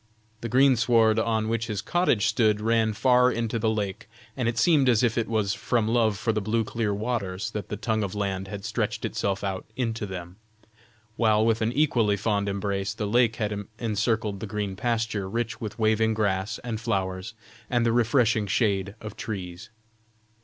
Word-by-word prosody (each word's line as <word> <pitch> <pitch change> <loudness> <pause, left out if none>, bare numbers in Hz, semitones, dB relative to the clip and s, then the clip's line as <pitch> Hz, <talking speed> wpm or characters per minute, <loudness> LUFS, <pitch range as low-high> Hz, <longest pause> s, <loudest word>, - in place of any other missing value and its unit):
The 115 - -5
greensward, 115 -3 +4
on 110 -1 0
which 115 0 -1
his 105 -3 -3
cottage 125 - +1
stood, 110 -3 +2
ran 110 0 +2
far 125 +3 +4
into 115 -1 -2
the 110 0 +1
lake, 105 -3 -3 0.3
and 125 -3 -1
it 115 - -4
seemed 140 0 +4
as 115 -1 +3
if 115 -2 +2
it 115 - 0
was 105 -3 0
from 115 -1 0
love 110 -3 +2
for 115 - 0
the 110 - -1
blue 110 +3 0
clear 110 -1 -2
waters 105 -1 -2
that 105 -1 -5
the 105 - -3
tongue 110 0 -1
of 100 -1 -3
land 95 -2 -2
had 100 0 -7
stretched 110 0 -2
itself 100 0 -2
out 95 -2 -2
into 115 -4 -2
them, 90 -1 -8 0.8
while 110 -2 +3
with 115 0 +2
an 110 +1 +1
equally 120 -7 +2
fond 100 -1 0
embrace 100 0 -2
the 105 - -3
lake 115 +1 +3
had 105 -3 -3
encircled 110 -2 -1
the 110 - -5
green 100 -1 -3
pasture 110 -3 -1
rich 120 +2 -3
with 105 -2 -5
waving 110 0 +2
grass 100 -2 0
and 115 -2 -4
flowers, 95 -1 -2 0.3
and 120 -1 +1
the 115 - +3
refreshing 115 -2 +2
shade 100 -1 0
of 110 -1 -7
trees. 95 -1 -6
110 Hz, 180 wpm, -26 LUFS, 100-115 Hz, 0.8 s, greensward